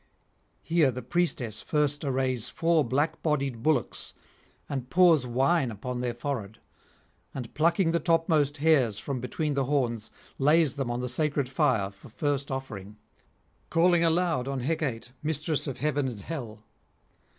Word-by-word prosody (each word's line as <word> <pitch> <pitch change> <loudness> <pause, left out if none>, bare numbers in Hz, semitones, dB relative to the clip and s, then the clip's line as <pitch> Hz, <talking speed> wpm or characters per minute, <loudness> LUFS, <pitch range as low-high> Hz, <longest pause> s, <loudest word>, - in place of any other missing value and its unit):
Here 165 -4 +3
the 125 0 -5
priestess 125 - -1
first 150 -1 0
arrays 130 -4 -1
four 165 -2 +2
black 145 +6 0
bodied 140 -7 -1
bullocks 155 +4 -1 0.5
and 130 -3 -4
pours 165 -7 +5
wine 135 +4 +2
upon 125 +3 -5
their 120 -1 -2
forehead; 115 -5 -4 0.8
and 125 -4 -6
plucking 170 +3 +2
the 170 - +1
topmost 160 -4 +2
hairs 140 -9 +3
from 135 +1 -4
between 150 +5 -2
the 135 -1 0
horns, 120 -6 -1 0.3
lays 150 0 +4
them 135 -4 -2
on 120 +1 -2
the 125 - -2
sacred 140 +1 0
fire 125 -8 +1
for 100 - -16
first 145 -2 -2
offering, 105 -7 -6 0.7
calling 170 +1 +4
aloud 165 -5 +1
on 135 -2 -2
Hecate, 130 -5 -2
mistress 155 0 -1
of 135 - -4
heaven 145 -2 0
and 115 -5 -6
hell. 115 -7 -7
140 Hz, 145 wpm, -28 LUFS, 125-155 Hz, 0.8 s, pours